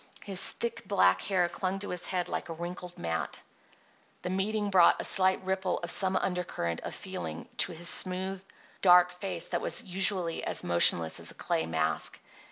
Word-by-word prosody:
His 195 -2 0
thick, 235 -1 -4
black 95 - +3
hair 185 -3 +1
clung 185 +2 -3
to 205 +1 -6
his 180 -1 -2
head 180 -2 -2
like - - -5
a - - -4
wrinkled 175 +1 -8
mat. 80 0 -4 0.8
The 180 - -3
meeting 205 +2 -1
brought 180 -3 +5
a - - -2
slight 190 0 +3
ripple 190 0 -1
of 170 - -3
some 190 -1 +1
undercurrent 180 - -2
of - - -6
feeling 80 -1 -7
to - - +1
his 170 +1 -2
smooth, 190 +1 +1 0.4
dark 180 -1 +6
face 180 -2 -5
that 175 - -2
was - - 0
usually 185 -2 +2
as - - -2
motionless 85 -2 +4
as - - -3
a - - -8
clay 80 - -2
mask. 80 -1 -1
180 Hz, 175 wpm, -29 LUFS, 170-190 Hz, 0.8 s, dark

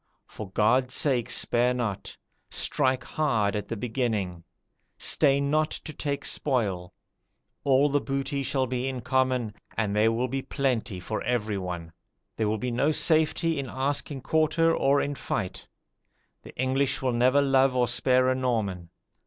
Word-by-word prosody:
For 105 -3 -9
God's 125 +6 +2
sake 130 -6 +1
spare 120 +1 +2
not; 115 -6 -4 0.3
strike 130 -2 0
hard 110 -10 0
at 105 - -3
the 115 - -4
beginning; 105 -7 -2 0.5
stay 140 -2 +3
not 155 +2 +1
to 155 - -6
take 140 -1 -3
spoil; 100 -10 -1 0.7
all 140 +1 +4
the 145 0 +1
booty 140 +1 -2
shall 135 -1 0
be 125 +1 -2
in 130 -2 -4
common, 130 -3 0 0.2
and 105 -2 0
there 110 +2 +4
will 120 +3 0
be 135 +2 -3
plenty 125 -9 -2
for 110 +4 -4
everyone. 95 -8 -3 0.4
There 110 -2 0
will 110 - 0
be 125 +3 -3
no 140 +6 +2
safety 160 0 +2
in 135 -2 -4
asking 135 +1 -2
quarter 160 +3 +2
or 140 +1 +3
in 145 - -2
fight: 100 -8 -4 0.7
the - - -13
English 135 +1 0
will 130 -2 +1
never 125 +4 +3
love 135 -2 +3
or 125 -1 +2
spare 130 +2 +2
a 130 - +3
Norman. 110 -9 -2
130 Hz, 155 wpm, -27 LUFS, 110-140 Hz, 0.7 s, all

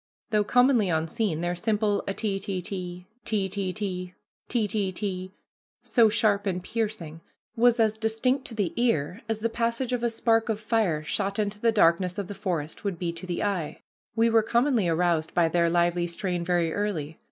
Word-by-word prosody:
Though 210 -1 +3
commonly 245 -2 +4
unseen, 165 +2 -1
their 175 0 -1
simple 210 +1 0
ah, 195 - -1
te 200 -2 -2
te 195 -1 -3
te, 180 -1 -6 0.2
te 205 -3 0
te 190 -1 -2
te, 180 -3 -4 0.3
te 230 -4 +1
te 200 -2 -1
te, 185 -1 -4 0.5
so 230 -4 +4
sharp 210 -2 +2
and 180 -2 -2
piercing, 205 -8 -4 0.3
was 240 0 +4
as 220 -1 +2
distinct 230 +4 0
to 230 - -6
the 200 -6 -1
ear 205 -6 0
as 220 -1 -1
the 230 - +2
passage 235 +2 -1
of 245 -1 -1
a 235 - +2
spark 225 0 +1
of 215 -2 0
fire 215 -9 0
shot 195 +5 -2
into 205 -1 -1
the 230 +1 +3
darkest 180 -3 +3
of 200 -3 -3
the 205 - -6
forest 175 -6 -3
would 200 -4 -2
be 170 -1 -2
to 175 +2 -7
the 175 - -2
eye. 185 -7 -2 0.3
We 225 0 +4
were 225 0 +5
commonly 235 -2 +2
aroused 165 -1 +1
by 170 -2 +4
their 170 0 +2
lively 175 0 +2
strain 175 0 -2
very 170 -2 +1
early. 165 -7 -3
200 Hz, 190 wpm, -26 LUFS, 175-225 Hz, 0.5 s, were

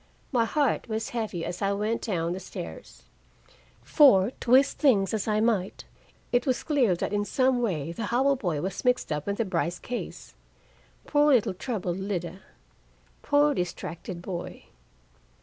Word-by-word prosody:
My 240 -4 +2
heart 280 -1 0
was 220 0 -2
heavy 215 -8 -3
as 175 +2 -5
I 200 0 +1
went 210 +3 -1
down 170 -6 -1
the 185 - -5
stairs. - - -9 0.8
For, 235 - +5
twist 260 +3 +3
things 210 - +3
as 215 -1 -2
I 215 -1 +2
might, 210 -5 0 0.5
it 245 +2 +1
was 255 -2 0
clear 255 - +2
that 175 - -3
in 205 0 +1
some 255 +4 +1
way 170 -9 -1
the 225 +6 -4
Howell 265 +5 +2
boy 170 -10 -2
was 190 +1 -4
mixed 250 -7 +1
up 150 +2 -3
in 200 - 0
the 230 - -1
Brice 175 -2 -1
case. 245 0 -7 0.7
Poor 295 0 +3
little 220 -5 +1
troubled 185 -4 -3
Lida! 190 -2 -4 0.8
Poor 290 0 +3
distracted 175 - -5
boy! 180 -2 -6
210 Hz, 155 wpm, -27 LUFS, 180-250 Hz, 0.8 s, For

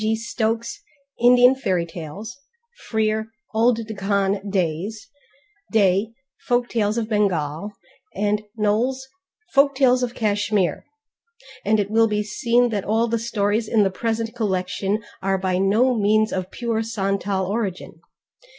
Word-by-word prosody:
g._ 220 +1 +2
Stokes, 230 - -2 0.4
Indian 245 +1 +7
Fairy 185 -10 -1
Tales; 170 +8 -8 0.5
Frere, 220 0 0 0.3
Old 230 0 +2
Deccan 200 -1 -1
Days; 190 +3 -2 0.6
Day, 200 0 +3 0.4
Folk 245 -1 +1
Tales 215 -1 0
of 225 -2 -1
Bengal; 195 -4 -1 0.4
and 210 +1 0 0.2
Knowles' 240 +6 0 0.5
Folk 280 0 +4
Tales 255 -2 +4
of 245 0 -2
Kashmir, 205 -5 0 0.8
and 215 +1 +2
it 205 0 -1
will 225 +1 +4
be 210 -1 0
seen 235 +3 +1
that 205 -4 -2
all 225 +3 +1
the 230 0 0
stories 220 -1 0
in 215 -2 +3
the 195 - +1
present 225 +2 -2
collection 200 -1 -1 0.2
are 195 0 +1
by 185 -1 -1
no 215 +7 +3
means 215 0 +2
of 185 -1 -3
pure 230 -1 -2
Santal 195 -3 -1
origin. 195 -2 -4
215 Hz, 130 wpm, -22 LUFS, 195-230 Hz, 0.8 s, Indian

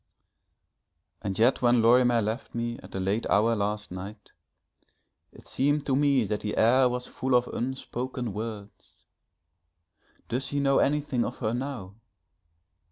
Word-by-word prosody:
And 100 -2 -3
yet 120 +4 +3
when 120 -1 +4
Lorimer 120 0 +4
left 110 +4 -4
me 120 0 -3
at - - -12
a - - -2
late 100 +4 -1
hour 115 +2 +3
last 105 -1 -2
night, 95 +4 -9 1.0
it - - -16
seemed 145 +2 0
to 135 - +1
me 140 -3 +3
that 105 0 -2
the 105 - -4
air 125 +3 +5
was 125 0 -3
full 130 -1 -1
of 125 0 +3
unspoken 125 -2 -4
words. 105 -1 -8 1.2
Does 130 +3 -2
he 145 +1 -2
know 140 -1 +3
anything 145 -4 +1
of 125 - -5
her 110 -2 -2
now! 120 -7 -5
120 Hz, 145 wpm, -27 LUFS, 110-130 Hz, 1.2 s, air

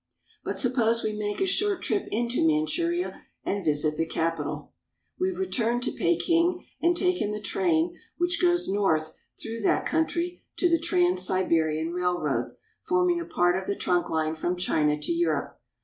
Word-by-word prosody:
But - - -3
suppose 235 -3 +2
we 215 - -1
make 210 -1 -3
a - - +4
short 400 0 0
trip 400 - -1
into 235 -1 0
Manchuria 335 - 0 0.2
and 200 -1 -2
visit 150 -1 +1
the 165 - 0
capital. 165 -2 -3 0.5
We 370 - +2
have 365 - -5
returned 245 -10 0
to - - 0
Peking 345 0 +1 0.2
and 345 +2 +3
taken 360 - +1
the 210 0 -3
train 175 -4 0 0.2
which 345 0 0
goes 350 -1 +3
north 160 -6 +1 0.2
through 225 0 -5
that 200 - +2
country 340 +2 -1 0.2
to 360 - +3
the 335 -1 +3
Trans 180 - +2
Siberian 165 -3 +1
Railroad, 180 0 -1 0.3
forming 360 -1 +2
a 340 - -4
part 175 0 +2
of 190 0 -3
the 200 - 0
trunk 180 -1 0
Hne 160 0 -1
from 175 +3 -1
China 150 -4 +1
to 150 - -3
Europe. 340 0 -1
210 Hz, 165 wpm, -27 LUFS, -, 0.5 s, a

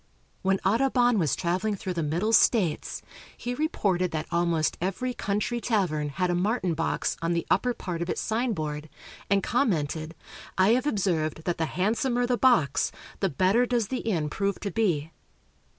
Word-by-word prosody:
When 190 0 +1
Audubon 245 +1 +3
was 155 -7 +1
traveling 185 +4 -1
through 185 -1 -4
the 170 - -2
Middle 170 +9 0
States, 200 -8 +2 0.3
he 245 - -3
reported 200 - 0
that 155 -1 -3
almost 170 -2 +1
every 195 +8 -2
country 210 +3 -2
tavern 175 -11 0
had 180 +5 -1
a - - +1
martin 185 0 0
box 165 +1 -1
on 165 +1 0
the 170 - -1
upper 245 -1 +2
part 170 -2 -5
of 170 - -3
its - - -1
signboard, 160 -11 -2 0.4
and 200 -1 +3
commented: 165 - 0 0.4
"I 190 +2 +5
have 255 +5 +3
observed 170 - 0
that 175 -1 -2
the 160 - +1
handsomer 240 - 0
the 245 0 +1
box, 235 - +3 0.3
the 195 - +1
better 190 - +2
does 235 -4 0
the 260 - -2
inn 170 -9 -1
prove 200 +6 -2
to 200 - -3
be." 165 -8 0
190 Hz, 165 wpm, -27 LUFS, 165-230 Hz, 0.4 s, I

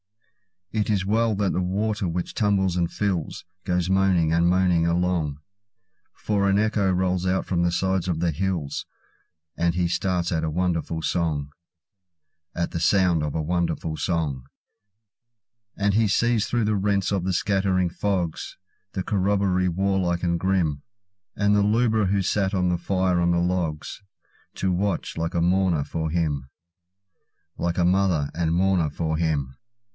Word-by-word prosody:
It 110 -1 -1
is 100 -3 +1
well 110 +2 +1
that 100 -1 0
the 90 - 0
water 100 +2 -1
which 85 +1 -3
tumbles 100 -4 +1
and 85 -1 +1
fills, 95 -7 -2 0.2
Goes 90 -1 0
moaning 95 -4 +3
and 85 +1 +3
moaning 90 -2 +3
along; 85 -4 0 0.8
For 100 -2 0
an 100 - +3
echo 105 -2 +1
rolls 90 0 0
out 95 +1 0
from 85 -2 0
the 85 0 +1
sides 95 -1 0
of 85 -3 -1
the 85 0 +1
hills, 85 -3 -3 0.7
And 85 0 +1
he 90 -1 +1
starts 90 -1 -1
at 80 -2 0
a - - -1
wonderful 85 -1 -1
song—At 80 +1 -5
the 85 - -3
sounds 90 0 +3
of 75 0 -3
a 80 - 0
wonderful 85 -1 -1
song. 75 -8 -2 1.3
And 100 0 +1
he 110 +1 +3
sees 115 +2 +2
through 120 -1 0
the 105 -1 +1
rents 100 -1 0
of 95 -3 -1
the 95 - 0
scattering 95 -1 +1
fogs, 90 -2 -2 0.4
The 95 - -2
corroboree 95 -2 +1
warlike 90 -1 0
and 85 -1 +1
grim, 85 -7 0 0.5
And 100 0 +2
the 105 - +4
lubra 110 0 +2
who 100 +1 +1
sat 100 +1 0
by 95 - +1
the 90 -1 +1
fire 95 0 0
on 85 0 +2
the 85 - +2
logs, 85 -2 -2 0.5
To 95 - -1
watch, 95 +1 -1
like 85 +1 -2
a 85 - +2
mourner, 90 -3 +2
for 80 +2 -3
him—Like 85 +3 -6
a 90 - +3
mother 90 -5 +2
and 80 0 0
mourner 90 -3 +2
for 80 +1 -2
him. 70 -5 -1
90 Hz, 155 wpm, -24 LUFS, 85-95 Hz, 1.3 s, the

